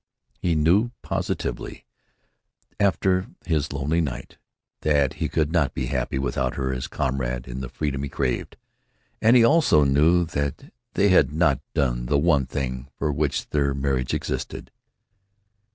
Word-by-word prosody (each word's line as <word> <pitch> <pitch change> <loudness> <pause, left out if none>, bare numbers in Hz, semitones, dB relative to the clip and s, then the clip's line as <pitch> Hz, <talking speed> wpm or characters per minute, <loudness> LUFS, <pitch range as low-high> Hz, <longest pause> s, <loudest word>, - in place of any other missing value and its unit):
He 85 -2 0
knew 90 +10 +3
positively, - - -3 0.9
after 95 0 +2 0.2
his 75 -3 0
lonely 70 +4 0
night, 65 -5 -5 0.4
that 70 -3 +2
he - - 0
could 75 -1 0
not 80 -6 +1
be 65 - -2
happy 65 +1 -1
without 65 -2 -1
her 65 0 -1
as 65 - -4
comrade 65 -2 -2
in 60 +1 -5
the 65 - -5
freedom 70 0 -3
he 70 - -4
craved. 65 -2 -2 0.6
And 115 +3 +5
he 120 - +7
also 115 - +5
knew 75 +6 +4
that 70 -4 -4 0.2
they 100 +1 +4
had 90 - +4
not 75 -4 +2
done - - 0
the 70 - +2
one 70 -4 +2
thing 65 -1 -4
for 75 - 0
which 70 - -1
their 70 -2 +1
marriage 65 -2 -1
existed. - - -4
70 Hz, 150 wpm, -24 LUFS, 65-85 Hz, 0.9 s, he